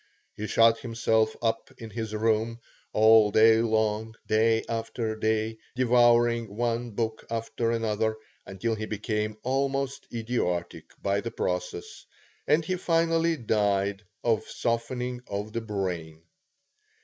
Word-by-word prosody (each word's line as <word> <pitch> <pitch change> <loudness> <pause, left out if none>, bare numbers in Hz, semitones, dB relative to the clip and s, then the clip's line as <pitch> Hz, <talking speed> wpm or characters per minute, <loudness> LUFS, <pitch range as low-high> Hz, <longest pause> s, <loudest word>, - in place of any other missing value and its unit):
He 105 - -5
shut 115 +1 +4
himself 115 -2 +1
up 115 0 0
in 115 -1 -9
his 110 -1 -4
room, 110 +1 0 0.3
all 110 -1 +6
day 110 +2 +6
long, 110 0 0
day 110 +1 +3
after 115 -1 -3
day, 110 0 -1 0.2
devouring 120 -3 +3
one 120 0 -1
book 110 0 -3
after 115 0 -2
another, 110 -1 0 0.3
until 95 +4 -2
he 110 0 -4
became 105 0 -2
almost 135 +1 -1
idiotic 110 -7 -2 0.2
by 100 +1 +1
the 115 - -4
process, 90 -4 -4 0.4
and 155 +3 +3
he 185 +2 -1
finally 165 -1 +2
died 100 -4 0 0.2
of 115 -3 +1
softening 125 +1 -2
of 105 +1 -4
the 115 - -2
brain. 90 -7 -4
110 Hz, 125 wpm, -27 LUFS, 105-120 Hz, 0.4 s, all